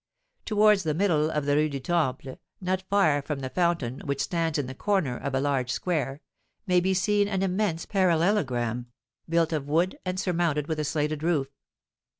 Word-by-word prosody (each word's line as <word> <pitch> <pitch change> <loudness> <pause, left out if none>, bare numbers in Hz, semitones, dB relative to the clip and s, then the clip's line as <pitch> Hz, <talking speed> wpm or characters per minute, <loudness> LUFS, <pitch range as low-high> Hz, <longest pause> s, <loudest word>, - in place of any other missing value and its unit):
Towards 210 -1 +4
the 155 -4 -1
middle 160 -5 +2
of 150 -2 -2
the 145 0 +2
Rue 155 +1 +2
du 140 -1 -4
Temple, 135 -3 -1 0.2
not 185 0 -1
far 160 -8 +3
from 140 0 -4
the 130 -1 -5
fountain 165 -6 0
which 140 -1 -2
stands 165 -3 -1
in 145 - -1
the 130 - -6
corner 170 -5 0
of 135 +2 -4
a - - +2
large 135 -3 0
square, 145 -2 -2 0.4
may 180 -3 +3
be 190 +2 +1
seen 205 +2 +2
an 195 -2 -1
immense 185 -3 0
parallelogram, 160 - +1 0.4
built 165 0 +2
of 145 -3 -2
wood, 170 +5 +1
and 185 0 -3
surmounted 170 -5 0
with 160 -2 -2
a 150 - -1
slated 150 0 -1
roof. 155 -5 0
160 Hz, 180 wpm, -27 LUFS, 140-185 Hz, 0.4 s, Towards